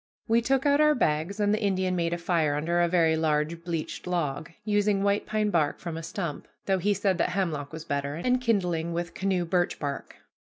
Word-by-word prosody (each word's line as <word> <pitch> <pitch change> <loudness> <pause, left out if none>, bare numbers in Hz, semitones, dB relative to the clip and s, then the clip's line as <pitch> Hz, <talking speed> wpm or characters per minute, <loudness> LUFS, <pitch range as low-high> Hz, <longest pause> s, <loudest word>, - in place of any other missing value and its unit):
We 230 +1 +3
took 265 +3 +1
out 285 +1 +4
our 300 0 +5
bags, 160 +1 0
and 205 0 +2
the 215 - 0
Indian 190 -2 +1
made 170 -1 0
a 175 - -1
fire 165 -4 +1
under 170 +4 +1
a 175 - +3
very 165 -2 +3
large 160 +1 0
bleached 170 0 -4
log, 155 -5 -2 0.2
using 205 -1 +2
white 200 0 +1
pine 215 -1 0
bark 155 -5 +1
from 170 -2 -6
a 165 - -4
stump, 165 -1 -5 0.2
though 190 -1 +1
he 205 +3 +1
said 190 -2 0
that - - +2
hemlock 165 -7 -2
was 160 0 -8
better, 140 0 -2
and 250 +9 +1
kindling 175 -8 0
with 170 0 -3
canoe 190 -2 0
birch 175 +1 0
bark. 140 -2 -5
175 Hz, 215 wpm, -27 LUFS, 160-200 Hz, 0.2 s, our